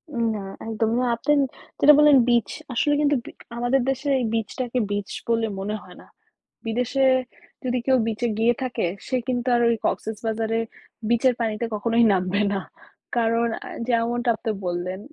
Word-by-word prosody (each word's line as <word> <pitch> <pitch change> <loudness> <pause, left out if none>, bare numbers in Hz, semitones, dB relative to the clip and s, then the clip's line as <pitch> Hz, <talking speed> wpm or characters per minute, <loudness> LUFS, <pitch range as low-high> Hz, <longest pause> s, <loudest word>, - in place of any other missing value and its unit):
উম 235 - 0
না 200 - -5 0.2
একদম। 225 0 0
না, 255 - +1
আপনি 295 +6 +1 0.5
যেটা 300 - +8
বললেন 295 -2 +7
বিচ, 235 -4 +3 0.2
আসলে 290 +5 +2
কিন্তু 290 -1 +3
বি - - -8 0.3
আমাদের 245 +2 +2
দেশে 270 +2 -2
এই 245 - 0
বিচটাকে 235 +3 -2
বিচ 205 -1 -2 0.2
বলে 230 -1 +2
মনে 205 +2 -3
হয় - - -14
না। - - -17 0.6
বিদেশে 250 +4 +1 0.6
যদি 250 0 0
কেউ 260 -1 +4
বিচে 225 +2 -1
গিয়ে 235 +2 +4
থাকে 245 -6 -1 0.2
সে 255 - 0
কিন্তু 245 -1 -1
আর 240 - +2
ওই 235 - +3
কক্সেসবাজারে 225 +1 -1 0.5
বিচের 240 +2 +3
পানিতে 225 0 -1
কখনোই 230 +3 +2
নামবে 185 +2 0
না। 195 - 0 0.6
কারণ 230 0 +2 0.2
আ - - -8 0.2
যেমনটা 240 +1 +1
আপনি 220 0 -3
বললেন 180 +2 -3
235 Hz, 165 wpm, -24 LUFS, 220-250 Hz, 0.6 s, যেটা